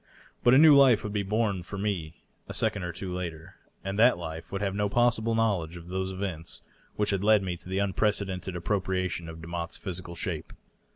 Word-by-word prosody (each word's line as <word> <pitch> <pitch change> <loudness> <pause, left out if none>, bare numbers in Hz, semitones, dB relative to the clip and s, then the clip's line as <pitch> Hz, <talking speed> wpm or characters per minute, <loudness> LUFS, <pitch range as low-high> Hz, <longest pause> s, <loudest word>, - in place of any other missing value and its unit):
But 120 +1 +6
a - - +7
new 155 0 +8
life 135 -5 +6
would 105 - -4
be 105 - +1
born 105 -1 0
for 95 +3 -7
me 95 -6 -3 0.2
a - - -6
second 110 -3 +1
or 90 -1 -3
two 90 +1 -6
later, 85 -3 -6 0.3
and 95 +2 -3
uiat 120 -1 +6
life 80 -1 -7
would 100 - -3
have 100 -1 0
no 105 0 0
possible 115 0 +2
knowledge 95 -8 0
of 85 0 -10
those 95 +1 -2
events 95 -4 -5 0.3
which 105 0 0
had 100 -1 -1
led 105 -1 +5
me 90 -2 -2
to 90 - -12
the 95 - -2
unprecedented 100 -2 0
appropriation 95 -2 -1
of 80 0 -9
Demotte's 85 0 -5
physical 90 -3 -6
shape. - - -4
95 Hz, 205 wpm, -28 LUFS, 85-105 Hz, 0.3 s, new